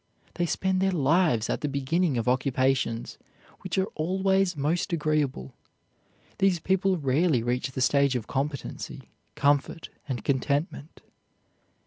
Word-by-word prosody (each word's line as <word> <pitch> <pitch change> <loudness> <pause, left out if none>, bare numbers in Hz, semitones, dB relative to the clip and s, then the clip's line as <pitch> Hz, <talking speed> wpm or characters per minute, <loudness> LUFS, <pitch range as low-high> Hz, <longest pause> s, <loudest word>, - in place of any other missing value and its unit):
They 175 -1 -1
spend 190 +2 0
their 190 0 +2
lives 150 - +2
at - - -2
the 150 - -1
beginning 140 +2 0
of 115 - -2
occupations, 130 -2 0 0.4
which 185 -2 -4
are 190 - +3
always 190 +1 +1
most 165 +7 -1
agreeable. 150 - -1 0.9
These 190 -3 +3
people 190 +2 +1
rarely 140 -2 +1
reach 125 +2 -1
the 130 - -3
stage 140 0 +3
of 120 -4 -2
competency, 140 +2 -5 0.2
comfort, 145 +3 +1 0.2
and 130 -4 -4
contentment. 140 +3 -2
145 Hz, 125 wpm, -27 LUFS, 130-180 Hz, 0.9 s, are